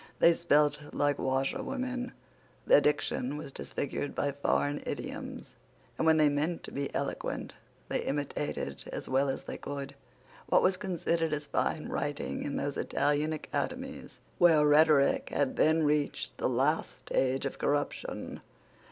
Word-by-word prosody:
They 170 - +6
spelt 150 -3 +3
like 145 -1 +1
washerwomen. 255 - -1 0.5
Their - - +7
diction 145 -2 0
was 150 -2 -7
disfigured 140 +1 -4
by 145 - 0
foreign 145 +1 0
idioms; - - -6 0.4
and, 160 - 0
when 160 0 +6
they 155 -1 +5
meant 150 +4 0
to - - -8
be 140 0 -3
eloquent, - - -3 0.3
they - - -1
imitated, 140 - -3
as - - -5
well 135 +1 +2
as 135 - -3
they - - -6
could, 140 -1 -5 0.5
what - - +4
was 185 - +4
considered 170 -4 -1
as 150 0 -2
fine 155 +1 -1
writing 145 0 -3
in 145 - -3
those 140 0 -2
Italian 145 +2 +1
academies 155 - -4 0.2
where 160 -4 +6
rhetoric 150 -1 +5
had 140 -2 0
then 160 +1 +4
reached 150 -1 0
the - - +1
last 130 +1 0
stage 130 +1 0
of 140 - -4
corruption. 145 0 -2
145 Hz, 145 wpm, -30 LUFS, 140-160 Hz, 0.5 s, Their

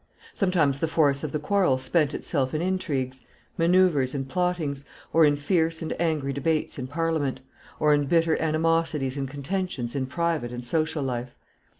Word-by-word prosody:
Sometimes 165 -8 +1
the 165 - 0
force 145 -3 +2
of 155 - -3
the - - -1
quarrel 180 -3 +2
spent 150 +2 +1
itself 135 -3 -1
in 155 - 0
intrigues, 135 -9 -2 0.3
manoeuvres, 165 -6 +3
and 135 -1 -3
plottings, 170 -4 -1 0.3
or 165 -1 +6
in 145 -1 +3
fierce 165 +2 0
and 160 - -2
angry 155 -5 0
debates 155 +1 -1
in 130 - -4
Parliament, 150 -2 -1 0.4
or 150 -1 +4
in 145 -1 +2
bitter 165 +1 +3
animosities 160 -3 +1
and 135 -2 -3
contentions 145 -3 -3
in 130 -2 -1
private 165 -4 -1
and 120 0 -6
social 155 +2 0
life. 125 -1 -4
150 Hz, 165 wpm, -26 LUFS, 135-165 Hz, 0.4 s, or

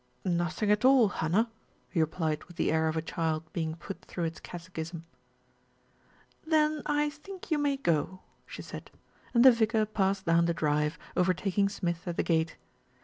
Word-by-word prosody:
"Nothing 180 +4 0
at 210 +2 +2
all, 255 -5 +6
Hannah," 195 +8 0 0.4
he 175 - -2
replied 160 -1 -1
with 175 - -15
the - - +1
air 160 0 +2
of 160 0 -1
a 160 - -1
child 160 -1 -1
being 160 -1 -2
put 185 +3 -8
through 175 - -5
its 165 0 -3
catechism. 170 -1 -7 1.4
"Then 310 -1 +2
I 295 0 +1
think 355 +5 -11
you 305 - +3
may 285 -1 +1
go," 185 - 0 0.3
she - - -8
said, - - -9 0.5
and 235 +2 +6
the 260 - +11
vicar 220 -1 +2
passed 195 -2 0
down 170 0 +4
the 170 0 0
drive, 150 0 0 0.2
overtaking 190 +2 +2
Smith 175 -3 -3
at 175 - -3
the - - +2
gate. 160 -1 0
180 Hz, 170 wpm, -29 LUFS, 165-225 Hz, 1.4 s, the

